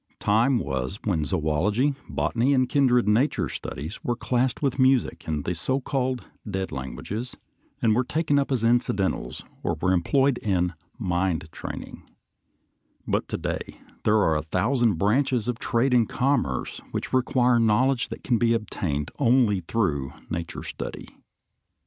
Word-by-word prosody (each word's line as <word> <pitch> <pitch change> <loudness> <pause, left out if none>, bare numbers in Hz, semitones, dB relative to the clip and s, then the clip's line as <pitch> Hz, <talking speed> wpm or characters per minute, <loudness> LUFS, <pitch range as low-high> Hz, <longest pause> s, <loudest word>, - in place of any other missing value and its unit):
Time 115 +6 +3
was 65 - -3
when 90 -7 +1
zoölogy, 95 - +1
botany, 125 +4 +1
and 130 -1 +3
kindred 125 -5 +3
nature 115 +8 +2
studies 80 +8 -6
were 120 - 0
classed 125 +1 0
with 135 -2 -1
music 130 -1 +2
and 75 -2 -1
the 90 - -1
so 130 +12 -1
called 130 -4 -2 0.2
dead 95 -1 -3
languages, 100 - -5 0.5
and 110 -2 +4
were 125 +4 +2
taken 145 +2 +1
up 140 - -1
as 125 -4 0
incidentals 115 -5 0 0.2
or 85 - -1
were 90 +2 +2
employed 135 +9 +2
in 90 -3 0 0.2
"mind 90 -3 -1
training"; - - -7 1.1
but - - 0
to - - -3
day - - -4 0.3
there 105 +1 +4
are 80 -7 +3
a - - -1
thousand 110 - +1
branches 115 - +1
of 120 -1 -2
trade 125 +2 +1
and 120 -3 +4
commerce 125 - 0
which - - -4
require 125 -1 +3
knowledge 120 +3 +2
that - - -8
can 120 -4 +1
be 115 -1 +3
obtained 90 -9 -3
only 115 -5 +4
through 80 - -1 0.2
nature 85 0 -4
study. - - -6
115 Hz, 150 wpm, -25 LUFS, 90-130 Hz, 1.1 s, and